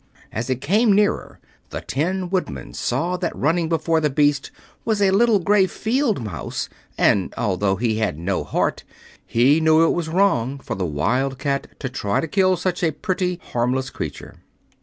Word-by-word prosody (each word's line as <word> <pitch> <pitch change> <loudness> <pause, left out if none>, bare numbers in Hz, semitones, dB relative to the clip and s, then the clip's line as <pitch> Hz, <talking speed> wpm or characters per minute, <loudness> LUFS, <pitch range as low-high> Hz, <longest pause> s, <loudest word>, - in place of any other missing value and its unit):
As 115 +3 -4
it 130 -1 -1
came 210 +7 +3
nearer 205 +1 +1 0.3
the - - -5
Tin 180 +5 -2
Woodman 75 - -3
saw 170 +9 -1
that 175 -2 -3
running 165 +3 +1
before 165 0 +1
the 150 - +2
beast 145 0 +1 0.3
was 220 -2 0
a 195 -2 +4
little 225 +2 +4
gray 195 +1 +3
field 225 - 0
mouse, 85 - -4 0.3
and 95 -3 +3
although 95 -2 +1
he 110 0 0
had 110 -9 -1
no 90 +3 -1
heart - - -1 0.4
he 130 +7 +4
knew 160 +1 +5
it - - +2
was 170 -2 -2
wrong 150 -8 +2
for 135 -4 -6
the 95 -4 -2
Wildcat 135 - -1
to 135 - -3
try 105 -5 -1
to 165 - -2
kill 185 +2 +2
such 180 0 -2
a 165 - +4
pretty, 180 +2 -2
harmless 130 +2 0
creature. - - -7
155 Hz, 170 wpm, -22 LUFS, 120-185 Hz, 0.4 s, knew